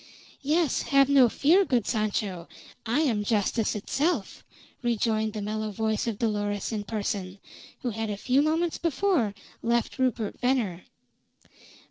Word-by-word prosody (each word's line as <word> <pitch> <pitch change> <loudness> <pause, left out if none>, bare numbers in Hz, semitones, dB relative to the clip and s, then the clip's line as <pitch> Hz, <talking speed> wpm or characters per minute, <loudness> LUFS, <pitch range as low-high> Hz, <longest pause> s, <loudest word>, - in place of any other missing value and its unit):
"Yes, 305 +2 +1
have 275 -1 +5
no 270 -4 +6
fear, 335 - +4
good 245 - +1
Sancho. 205 -5 -2 0.4
I 240 +7 +2
am 230 -9 +1
Justice 215 +1 0
itself!" 275 - -1 0.4
rejoined 220 -2 0
the 210 -2 -4
mellow 215 +1 -2
voice 220 +2 -1
of 225 -3 -2
Dolores 205 -2 -1
in 210 -2 -3
person, 200 -3 -3 0.5
who 245 - -1
had 225 0 -3
a 205 - -3
few 255 +6 +2
moments 320 +2 0
before 335 - +1 0.3
left 235 +3 0
Rupert 240 -5 -1
Venner. 235 -9 0
225 Hz, 135 wpm, -27 LUFS, 210-270 Hz, 0.5 s, no